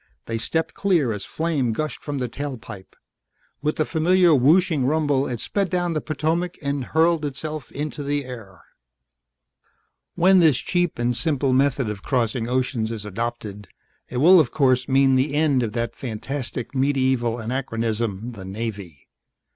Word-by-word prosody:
They 115 0 -3
stepped 160 +7 -2
clear 170 - +1
as 100 -2 -5
flame 150 -8 -1
gushed 155 +6 -4
from 145 -1 -4
the 125 -2 -2
tail 140 +2 -5
pipe; 105 -4 -11 0.7
with 150 +1 0
the 155 - 0
familiar 175 +2 +3
whooshing 150 +2 +4
rumble 145 -2 +1
it 120 -2 -4
sped 195 - -1
down 175 -1 0
the 155 - -1
Potomac 165 +4 -2
and 140 -2 -2
hurled 160 +2 +2
itself 150 +1 -5
into 150 0 -4
the 145 0 -2
air. 110 -8 -10 1.5
"When 185 +2 +5
this 155 -7 +5
cheap 175 +4 -1
and 120 +1 0
simple 135 +1 0
method 135 -1 +2
of 105 -2 -5
crossing 120 -1 -1
oceans 125 -3 0
is 110 -2 -5
adopted, 105 -1 -5 0.4
it 125 - -4
will 175 +7 +7
of 145 -7 +3
course 130 -3 +2
mean 135 0 +4
the 135 +3 +1
end 145 -4 +3
of 115 -3 -2
that 115 -1 -2
fantastic 125 +1 -5
medieval 130 -3 +1
anachronism, 115 -2 -2
the 105 -5 -10
Navy. 100 - -6
135 Hz, 155 wpm, -23 LUFS, 115-155 Hz, 1.5 s, will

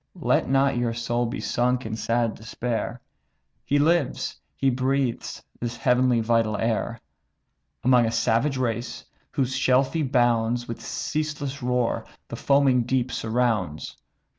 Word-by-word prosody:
Let - - +1
not 135 -1 +3
your 120 -1 -1
soul 120 0 -1
be 120 - -4
sunk 125 0 0
in 110 0 -3
sad 115 0 0
despair; 115 +1 -4 0.6
He 145 - +1
lives, 155 -1 +1
he 135 -1 +2
breathes 130 0 -1 0.2
this 120 0 -4
heavenly 125 -2 +3
vital 110 -2 +1
air, 115 +1 -1 0.8
Among 125 -2 +5
a - - -1
savage 115 +5 +1
race, 120 -2 -3 0.2
whose 130 -1 -1
shelfy 130 +5 +2
bounds 120 -3 +1
With 115 - -6
ceaseless 150 -2 -3
roar 125 -1 0 0.3
the - - -5
foaming 140 -3 +3
deep 125 +1 0
surrounds. 110 -9 -1
125 Hz, 130 wpm, -25 LUFS, 115-130 Hz, 0.8 s, Among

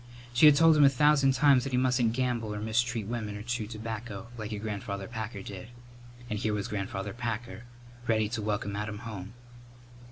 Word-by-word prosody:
She 125 +6 +7
had 150 - +8
told 165 +1 +6
him 150 - +6
a 140 - +8
thousand 140 0 +4
times 135 -1 +5
that 135 -1 -5
he - - +3
mustn't 125 -3 +2
gamble 120 -4 -1
or - - -4
mistreat 115 +1 0
women 110 -2 -4
or 105 - -7
chew 120 -2 -2
tobacco 110 -1 -6
"like 110 -2 -6
your 105 - -3
Grandfather 100 -2 -4
Packer 110 -3 -5
did." 100 +2 -8 0.6
And 105 -2 -3
here 110 -1 0
was 100 - -2
Grandfather 100 -1 -4
Packer, 120 0 -5 0.4
ready 110 -2 +2
to 115 -1 -3
welcome 105 -1 -2
Adam 105 0 -4
home! 105 0 -7
110 Hz, 190 wpm, -29 LUFS, 105-125 Hz, 0.6 s, had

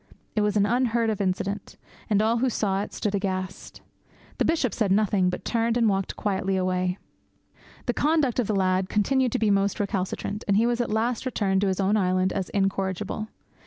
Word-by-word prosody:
It 215 - +2
was 210 0 +1
an 200 - +4
unheard 235 0 +1
of 210 - -3
incident, 195 +1 -2 0.3
and 210 0 +3
all 225 +2 +2
who 260 +2 +2
saw 200 -4 0
it - - -5
stood 210 - -2
aghast. 185 -2 -4 0.6
The - - +3
Bishop 280 - +1
said 210 -5 0
nothing, 195 -2 +3
but 180 - -5
turned 230 0 +1
and 230 -2 +3
walked 195 -2 0
quietly 195 -1 -1
away. 185 0 0 0.9
The 245 - 0
conduct 290 -4 +1
of 235 - +1
the 215 - 0
lad 185 0 +1
continued 255 +4 +2
to - - +2
be 215 -2 +2
most 200 0 +1
recalcitrant, 200 +1 -2
and 200 -1 +3
he 225 - +4
was 240 0 +1
at 240 - -2
last 225 +2 0
returned 195 -6 0
to 200 - +2
his 190 0 -1
own 200 +2 +2
island 185 -1 +1
as 190 -2 -3
incorrigible. 195 +1 -1
205 Hz, 200 wpm, -25 LUFS, 190-225 Hz, 0.9 s, an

